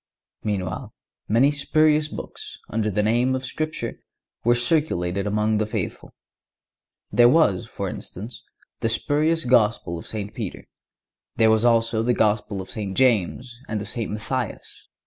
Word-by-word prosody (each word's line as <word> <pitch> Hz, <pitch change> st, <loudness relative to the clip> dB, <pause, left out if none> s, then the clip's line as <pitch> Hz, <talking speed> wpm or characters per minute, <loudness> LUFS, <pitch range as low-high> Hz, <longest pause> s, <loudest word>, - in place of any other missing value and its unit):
Meanwhile, 100 Hz, -3 st, -3 dB, 0.3 s
many 120 Hz, +7 st, +4 dB
spurious 150 Hz, +1 st, +2 dB
books, -, -, -8 dB
under 110 Hz, -1 st, 0 dB
the 105 Hz, +1 st, 0 dB
name 120 Hz, +4 st, +2 dB
of 130 Hz, 0 st, -4 dB
Scripture, 155 Hz, +4 st, -4 dB, 0.4 s
were 120 Hz, +1 st, +4 dB
circulated 105 Hz, -, 0 dB
among 105 Hz, +1 st, +1 dB
the 110 Hz, -, 0 dB
faithful. -, -, -5 dB, 1.0 s
There 120 Hz, 0 st, +6 dB
was, 135 Hz, -, +3 dB
for -, -, -4 dB
instance, 110 Hz, +6 st, -7 dB, 0.4 s
the 115 Hz, -, 0 dB
spurious 155 Hz, +7 st, +1 dB
Gospel 110 Hz, -8 st, +2 dB
of -, -, -11 dB
St. 105 Hz, -1 st, -4 dB
Peter; 105 Hz, -6 st, -6 dB, 0.7 s
there 110 Hz, -1 st, +5 dB
was 110 Hz, 0 st, +3 dB
also 115 Hz, -1 st, +3 dB
the 120 Hz, +1 st, +1 dB
Gospel 105 Hz, -2 st, +1 dB
of 95 Hz, -, -10 dB
St. 100 Hz, -5 st, -4 dB
James 120 Hz, 0 st, +1 dB
and 110 Hz, -, -2 dB
of 100 Hz, -, -6 dB
St. 115 Hz, -1 st, -2 dB
Matthias. 115 Hz, +3 st, -4 dB
115 Hz, 145 wpm, -24 LUFS, 105-130 Hz, 1.0 s, There